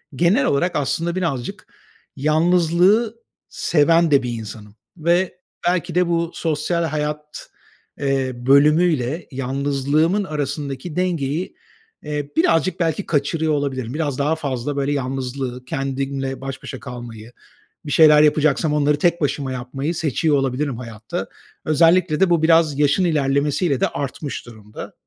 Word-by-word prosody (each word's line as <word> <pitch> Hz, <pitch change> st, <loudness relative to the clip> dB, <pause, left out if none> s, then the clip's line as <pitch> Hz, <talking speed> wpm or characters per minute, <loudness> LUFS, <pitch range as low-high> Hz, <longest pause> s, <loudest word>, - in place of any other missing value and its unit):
genel 185 Hz, -, +3 dB
olarak 170 Hz, +6 st, +1 dB
aslında 165 Hz, +4 st, -1 dB
birazcık 160 Hz, -10 st, -3 dB, 0.5 s
yalnızlığı 175 Hz, -, +3 dB, 0.3 s
seven 165 Hz, +1 st, +2 dB
de 140 Hz, -2 st, +4 dB
bir 125 Hz, -, -3 dB
insanım 105 Hz, -2 st, -8 dB, 0.2 s
ve 175 Hz, +3 st, +1 dB, 0.3 s
belki 175 Hz, -1 st, 0 dB
de 180 Hz, 0 st, +3 dB
bu 170 Hz, -1 st, 0 dB
sosyal 165 Hz, +2 st, -1 dB
hayat, 150 Hz, -1 st, -4 dB, 0.5 s
eee, 135 Hz, -2 st, 0 dB
bölümüyle 145 Hz, +3 st, +3 dB
yalnızlığımın 140 Hz, +7 st, 0 dB
arasındaki 145 Hz, -2 st, -4 dB
dengeyi, 170 Hz, -3 st, -1 dB, 0.5 s
eee, 150 Hz, -1 st, -4 dB
birazcık 165 Hz, +2 st, +2 dB
belki 165 Hz, +3 st, 0 dB
kaçırıyor 155 Hz, +1 st, 0 dB
olabilirim. 130 Hz, -4 st, -2 dB
Biraz 145 Hz, -4 st, -2 dB
daha 150 Hz, +3 st, +1 dB
fazla, 140 Hz, -2 st, -3 dB
böyle, 140 Hz, +1 st, 0 dB
yalnızlığı, 130 Hz, -1 st, -4 dB
kendimle 135 Hz, 0 st, -3 dB
baş 135 Hz, -1 st, -6 dB
başa 130 Hz, -, -7 dB
kalmayı, 120 Hz, -3 st, -9 dB, 0.5 s
bir 145 Hz, -, -5 dB
şeyler 150 Hz, -2 st, +7 dB
yapacaksam 150 Hz, 0 st, +2 dB
onları 150 Hz, 0 st, +2 dB
tek 170 Hz, +1 st, +2 dB
başıma 140 Hz, -2 st, -1 dB
yapmayı 135 Hz, +6 st, -4 dB
seçiyor 155 Hz, 0 st, +1 dB
olabilirim 135 Hz, -1 st, -1 dB
hayatta. 115 Hz, -3 st, -6 dB, 0.4 s
Özellikle 165 Hz, +1 st, +3 dB
de 190 Hz, -, +4 dB
bu 170 Hz, -2 st, +3 dB
biraz 160 Hz, -3 st, +4 dB
yaşın 150 Hz, +5 st, +3 dB
ilerlemesiyle 145 Hz, -1 st, +1 dB
de -, -, +2 dB
artmış 140 Hz, 0 st, -5 dB
durumda. 110 Hz, -3 st, -10 dB
150 Hz, 125 wpm, -21 LUFS, 135-165 Hz, 0.5 s, şeyler